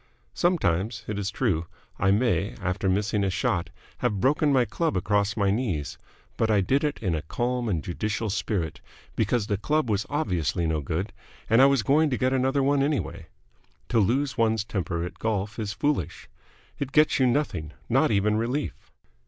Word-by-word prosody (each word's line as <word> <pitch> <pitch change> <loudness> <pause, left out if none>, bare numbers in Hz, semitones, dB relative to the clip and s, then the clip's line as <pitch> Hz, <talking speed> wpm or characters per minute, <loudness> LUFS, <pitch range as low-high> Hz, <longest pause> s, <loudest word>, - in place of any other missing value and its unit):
Sometimes, 110 - 0
it 105 -1 -3
is 100 0 -1
true, 90 -11 -1 0.3
I 95 - +2
may, 100 -2 +1
after 95 0 -1
missing 100 +2 +1
a 100 - +1
shot, 85 -1 -1 0.3
have 105 - 0
broken 145 +5 +2
my 130 -3 +4
club 165 - -1
across 100 +3 +1
my 100 -2 +2
knees; 100 - -2 0.4
but 110 - +1
I 105 -2 +4
did 130 +10 +1
it 150 -1 0
in 95 -4 +1
a 80 - -1
calm 120 +8 -2
and 85 -6 -1
judicial 105 +4 -2
spirit, 90 -6 -2 0.3
because 110 0 +1
the 100 -1 -1
club 150 0 0
was 105 0 0
obviously 90 - 0
no 80 -1 0
good 85 +8 -3 0.3
and 115 +4 +5
I 135 - +8
was 140 -4 +2
going 150 +7 +3
to 130 - -1
get 130 0 +1
another 135 +1 +2
one 140 +1 +2
anyway. 145 +1 -2 0.6
To 115 - +3
lose 130 +6 +1
one's 110 -2 +2
temper 90 -6 -3
at 90 - -7
golf 110 0 -2
is 105 -2 -2
foolish. 100 - -2 0.5
It 140 -1 -4
gets 150 -1 +4
you 130 - +4
nothing, 120 - -1 0.2
not - - +3
even 105 0 +2
relief. 125 +6 -3
110 Hz, 180 wpm, -26 LUFS, 95-130 Hz, 0.6 s, I